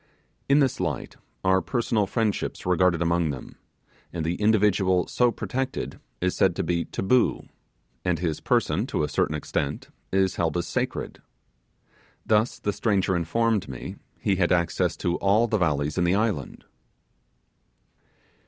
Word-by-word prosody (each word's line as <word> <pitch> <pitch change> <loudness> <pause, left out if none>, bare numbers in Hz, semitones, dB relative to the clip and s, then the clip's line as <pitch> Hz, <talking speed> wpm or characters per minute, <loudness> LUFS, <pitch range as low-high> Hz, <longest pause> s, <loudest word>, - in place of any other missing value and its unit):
In 140 - +6
this 135 -3 +1
light - - -3 0.3
are 95 0 +3
personal 105 +3 0
friendships 110 0 -1
regarded 90 -1 +3
among 85 -1 +1
them, 65 -4 -7 0.6
and 85 -2 -3
the 85 - 0
individual 100 -4 +3
so 125 -1 +2
protected 130 +2 -4 0.2
is - - 0
said - - +3
to - - -1
be 85 -1 0
'taboo', 120 +6 +1 0.6
and - - +1
his 80 -3 -2
person, - - +1
to - - -1
a - - +1
certain 75 - 0
extent, 75 -1 -3 0.2
is 95 -1 +1
held 85 -1 0
as 85 - -1
sacred. - - -3 1.0
Thus 110 +2 +2
the 105 - -2
stranger 95 -3 +1
informed 105 +4 0
me 65 -2 -7 0.2
he 95 - +1
had 85 -2 +2
access 85 -2 +1
to 85 0 -1
all 105 +4 +3
the 110 -2 0
valleys 75 -2 0
in - - +2
the 90 +2 +3
island. 105 -10 -2
95 Hz, 145 wpm, -25 LUFS, 85-105 Hz, 1.0 s, In